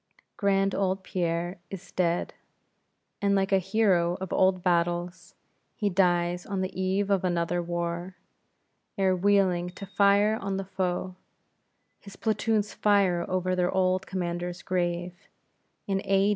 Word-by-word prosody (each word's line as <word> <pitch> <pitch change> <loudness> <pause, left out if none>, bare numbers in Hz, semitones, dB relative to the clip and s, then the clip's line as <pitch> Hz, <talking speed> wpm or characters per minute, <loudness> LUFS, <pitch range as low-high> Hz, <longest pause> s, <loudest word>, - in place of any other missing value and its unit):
Grand 195 -1 +1
old 190 -1 0
Pierre 175 0 -2
is 195 -1 -9
dead; 175 -1 0 0.9
and 200 0 +2
like 195 0 +1
a 195 - +5
hero 185 -3 +2
of 190 -1 -5
old 185 -1 +2
battles, 175 0 -1 0.4
he 205 -2 -1
dies 175 -1 +2
on 195 -2 -3
the 185 0 -3
eve 190 +2 0
of 195 -2 +2
another 175 -1 0
war; 175 +1 -3 0.8
ere 190 -1 +3
wheeling 185 -2 +2
to 185 +2 -9
fire 200 +3 +3
on 195 -1 -2
the 195 - -4
foe, 185 -1 -3 0.8
his 200 -1 -13
platoons 220 -1 0
fire 195 -4 +2
over 185 0 0
their 180 -1 +1
old 185 0 +1
commander's 175 -1 -4
grave; 175 -1 -1 0.7
in 195 -1 -1
A. 195 +1 +3
185 Hz, 135 wpm, -27 LUFS, 175-195 Hz, 0.9 s, a